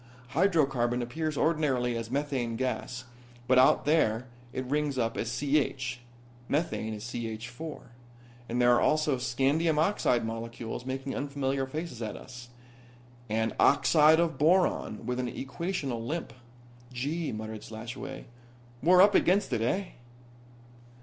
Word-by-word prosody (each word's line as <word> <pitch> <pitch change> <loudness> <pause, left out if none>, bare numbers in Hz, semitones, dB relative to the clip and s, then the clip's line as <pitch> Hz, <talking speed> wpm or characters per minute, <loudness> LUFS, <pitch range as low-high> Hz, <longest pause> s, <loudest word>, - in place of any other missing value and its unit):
Hydrocarbon 135 -9 +2
appears 155 +5 -3
ordinarily 135 -7 +1
as 115 -1 -4
methane 130 -4 -1
gas, 130 0 -3 0.4
but 130 0 +5
out 130 - +5
there 130 -7 +2 0.3
it 130 0 -4
rings 145 +1 -1
up 115 -2 0
as 115 - -2
CH. 135 -4 0 0.5
Methane 140 -8 -1
is 105 - -8
CH4. 120 +5 -6 0.7
And 120 +2 -1
there 120 0 +5
are 120 - +3
also 155 -3 +2
scandium 140 +6 +1
oxide 150 - +2
molecules 115 +2 -5
making 135 +1 -3
unfamiliar 140 -1 -2
faces 150 -3 -5
at 110 -2 -4
us. 125 -2 -11 0.8
And 110 +1 0
oxide 155 +2 +5
of 165 -5 0
boron 160 - +2
with 125 +1 -2
an 125 -1 -2
equational 135 -5 -3
limp." 155 +6 -4 0.6
"Gee," 145 +6 -2
muttered 110 0 -6
Slashaway. 115 +4 -7 0.6
"We're 180 +4 +7
up 205 +1 +5
against 195 +2 +3
it, 110 - 0
eh?" 185 - 0
130 Hz, 130 wpm, -29 LUFS, 120-155 Hz, 0.8 s, We're